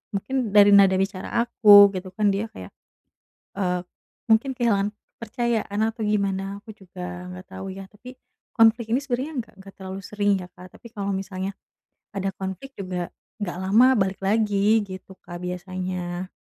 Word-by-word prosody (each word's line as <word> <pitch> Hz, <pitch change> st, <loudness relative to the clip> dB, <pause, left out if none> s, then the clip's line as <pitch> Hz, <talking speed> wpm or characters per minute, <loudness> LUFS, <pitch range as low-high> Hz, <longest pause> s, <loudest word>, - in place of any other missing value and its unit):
Mungkin 250 Hz, +2 st, -2 dB
dari 205 Hz, 0 st, +8 dB
nada 195 Hz, -1 st, +6 dB
bicara 195 Hz, -1 st, -3 dB, 0.2 s
aku 205 Hz, -4 st, +8 dB
gitu 185 Hz, 0 st, -5 dB
kan, 210 Hz, 0 st, +2 dB
dia 205 Hz, +3 st, -2 dB
kayak, 95 Hz, 0 st, -10 dB, 0.9 s
eee, 180 Hz, -2 st, 0 dB, 0.5 s
mungkin 230 Hz, +5 st, +4 dB
kehilangan 205 Hz, -4 st, +1 dB, 0.3 s
kepercayaan 230 Hz, -2 st, -2 dB
atau 225 Hz, 0 st, -8 dB
gimana, 200 Hz, -1 st, -1 dB
aku 220 Hz, -, -13 dB
juga 180 Hz, -2 st, -8 dB
gak 185 Hz, -, -16 dB
tau 190 Hz, 0 st, -7 dB
ya, 195 Hz, +1 st, -8 dB
tapi 250 Hz, +5 st, -13 dB, 0.4 s
konflik 225 Hz, 0 st, +4 dB
ini 255 Hz, -, +3 dB
sebenernya 265 Hz, 0 st, -3 dB
gak -, -, -26 dB
gak 195 Hz, -1 st, -14 dB
terlalu 190 Hz, 0 st, -6 dB
sering 205 Hz, -1 st, +1 dB
ya 180 Hz, -, -9 dB
Kak, 180 Hz, -1 st, -14 dB
tapi 235 Hz, -, -13 dB
kalau 200 Hz, -2 st, -2 dB
misalnya 190 Hz, 0 st, -4 dB, 0.6 s
ada 195 Hz, -1 st, -1 dB
konflik 190 Hz, +8 st, -6 dB
juga 180 Hz, -2 st, -4 dB, 0.3 s
gak 175 Hz, -3 st, -3 dB
lama, 225 Hz, +8 st, +5 dB
balik 195 Hz, -1 st, -1 dB
lagi 210 Hz, +1 st, +2 dB
gitu 190 Hz, 0 st, -10 dB
Kak 175 Hz, -1 st, -9 dB
biasanya. 180 Hz, 0 st, -4 dB
195 Hz, 155 wpm, -24 LUFS, 185-220 Hz, 0.9 s, dari